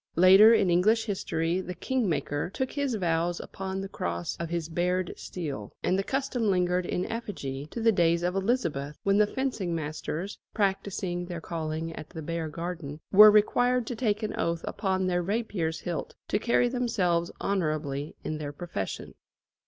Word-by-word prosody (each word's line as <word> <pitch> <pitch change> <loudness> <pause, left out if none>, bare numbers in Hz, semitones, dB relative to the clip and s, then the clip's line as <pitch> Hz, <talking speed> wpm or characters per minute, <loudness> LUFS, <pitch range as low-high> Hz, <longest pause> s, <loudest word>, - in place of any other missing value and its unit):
Later, 190 +5 +8
in 200 -6 +4
English 215 +6 +3
history, 175 -4 -1
the 180 -1 -6
King 255 -3 0
Maker 145 0 -1
took 260 -1 -1
his 280 -4 -1
vows 175 -2 0
upon 190 0 -5
the 195 - -4
cross 85 - -3
of 170 -1 -4
his 170 -2 -2
bared 180 +2 0
steel, 140 - -6
and 185 - +2
the 195 - +2
custom 260 -2 -1
lingered 180 -1 +1
in 180 - -1
effigy 145 - -5
to 235 - -6
the 225 0 +4
days 170 -3 +2
of 180 +1 0
Elizabeth, 170 - -1
when 200 +1 +3
the 210 - +5
fencing 220 -9 -2
masters, 160 +4 -4 0.2
practising 190 -3 -1
their 175 -2 -5
calling 160 -1 -4
at 155 -1 -9
the 160 -3 -7
Bear 165 0 -3
Garden, 165 -2 -5
were 210 +2 +10
required 245 +4 +3
to 245 - -4
take 220 -2 0
an 215 - -2
oath 170 0 0
upon 190 -2 0
their 180 -1 +1
rapier's 185 -5 -2
hilt 175 -2 -4
to 205 - +1
carry 245 +2 +3
themselves 210 -9 0
honourably 155 -6 -1
in 155 0 -3
their 145 -1 -4
profession. 145 - -5
180 Hz, 170 wpm, -28 LUFS, 165-210 Hz, 0.2 s, were